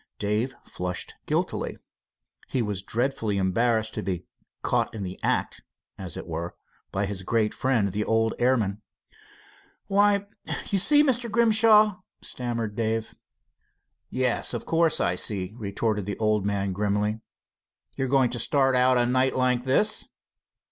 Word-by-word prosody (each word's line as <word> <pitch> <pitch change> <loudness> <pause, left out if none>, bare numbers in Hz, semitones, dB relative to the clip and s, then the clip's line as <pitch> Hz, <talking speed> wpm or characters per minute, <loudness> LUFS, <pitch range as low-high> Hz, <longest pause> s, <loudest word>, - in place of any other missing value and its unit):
Dave 105 +6 -1
flushed 90 0 -4
guiltily. - - -1 0.7
He 125 - -1
was 105 -3 -3
dreadfully 115 -1 -1
embarrassed 110 +4 +1
to 105 - -3
be 90 -3 -3 0.4
"caught - - +1
in 105 - -4
the 90 0 -6
act" - - -1 0.3
as 90 -4 -7
it - - -6
were, 85 +1 -5 0.4
by 100 +1 0
his 95 -1 -4
great 110 +2 0
friend, 115 -7 +1
the 105 +3 -1
old 115 0 +1
airman. 110 -5 +1 1.0
"Why 200 0 +3 0.4
you 195 - +2
see, 295 +9 +6
Mr. 250 -4 +1
Grimshaw 215 -2 +5
" - - -53
stammered 115 -4 -4
Dave. 115 0 -1 1.0
"Yes, 130 -2 0
of - - -5
course 165 -1 +2
I 85 - +1
see," 95 +1 0
retorted 105 -2 -2
the 105 - -3
old 105 -2 +1
man 100 -1 -1
firmly. 105 +2 -1 0.7
"You're 135 - -1
going 130 -2 +3
to 120 - -3
start 135 -1 +2
out 125 0 +4
a 120 - +3
night 130 +2 +2
like 125 -1 +1
this." 205 +12 +1
115 Hz, 145 wpm, -26 LUFS, 100-130 Hz, 1.0 s, see